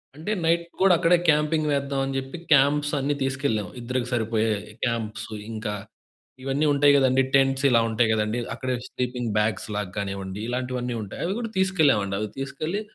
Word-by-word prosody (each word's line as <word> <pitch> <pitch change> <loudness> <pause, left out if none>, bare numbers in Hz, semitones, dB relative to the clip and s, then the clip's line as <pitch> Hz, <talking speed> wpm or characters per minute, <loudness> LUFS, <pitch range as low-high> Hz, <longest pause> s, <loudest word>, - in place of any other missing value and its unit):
అంటే 160 +8 -4
నైట్ 170 +1 +2 0.2
కూడా 190 -1 +6
అక్కడే 175 +1 +4
క్యాంపింగ్ 150 +1 +2
వేద్దాం 140 -1 -1
అని 135 0 -4
చెప్పి 135 +4 -5
క్యాంప్స్ 145 +1 +4
అన్నీ 140 +2 0
తీసుకెళ్ళాం 130 -6 -1
ఇద్దరికి 125 +1 -2
సరిపోయే 110 -1 +1 0.3
క్యాంప్సు 110 -2 -3 0.2
ఇంకా 110 -1 -4 0.7
ఇవన్నీ 135 +3 0
ఉంటాయి 145 0 +5
కదండీ. 130 -1 +4
టెంట్స్ 135 0 +3
ఇలా 120 -2 +5
ఉంటాయి 110 0 +2
కదండీ. 110 +2 0
అక్కడే 130 +1 -2
స్లీపింగ్ 125 -1 -3
బ్యాగ్స్‌లాగా 105 -2 -2
కానివ్వండి 100 0 -4
ఇలాంటివన్నీ 125 -1 -2
ఉంటాయి. 100 - -7
అవి 190 +4 -1
కూడా 230 -2 -4
తీసుకెళ్ళామండి. 150 - +2
అవి 105 0 -3
తీసుకెళ్ళి 155 +8 -3
130 Hz, 155 wpm, -25 LUFS, 110-145 Hz, 0.7 s, కూడా